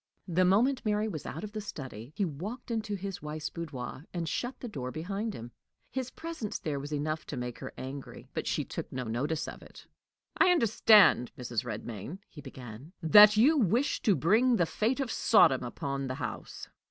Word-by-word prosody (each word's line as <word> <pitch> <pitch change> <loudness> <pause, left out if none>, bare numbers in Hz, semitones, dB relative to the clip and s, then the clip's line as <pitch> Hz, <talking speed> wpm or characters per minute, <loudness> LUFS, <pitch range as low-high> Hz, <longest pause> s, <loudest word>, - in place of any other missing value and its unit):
The 180 +1 +2
moment 240 +9 +3
Mary 210 0 +1
was 155 -9 -5
out 160 - -6
of 210 - -6
the 215 0 -4
study, 130 - -8
he 200 - +1
walked 200 - -6
into 220 -2 -2
his 195 -1 -5
wife's 150 +1 -5
boudoir, 145 -4 -6
and 170 -2 -2
shut 245 - -3
the 245 - -6
door 130 - -5
behind 195 - -3
him. 120 +1 -8 0.4
His 260 -1 -3
presence 320 -8 -5
there 145 -3 -3
was 145 +2 -7
enough 155 +1 -2
to 145 - -5
make 125 -1 -5
her - - -6
angry, 135 +1 -8
but - - -3
she - - 0
took - - -6
no 130 0 -3
notice 140 +8 -2
of - - -8
it. - - -14 0.5
"I 370 - +5
understand, 220 - +5
Mrs. 120 -3 -2
Redmain," 115 - -6
he 150 - -12
began, 125 +5 -10
"that 210 +6 +9
you 290 +7 +5
wish 240 +6 +1
to 205 -5 +3
bring 225 +10 +3
the 175 - +3
fate 225 - 0
of 265 -4 -1
Sodom 135 - +5
upon 135 +2 -4
the 130 - -3
house." 120 -6 -6
170 Hz, 190 wpm, -30 LUFS, 135-215 Hz, 0.5 s, that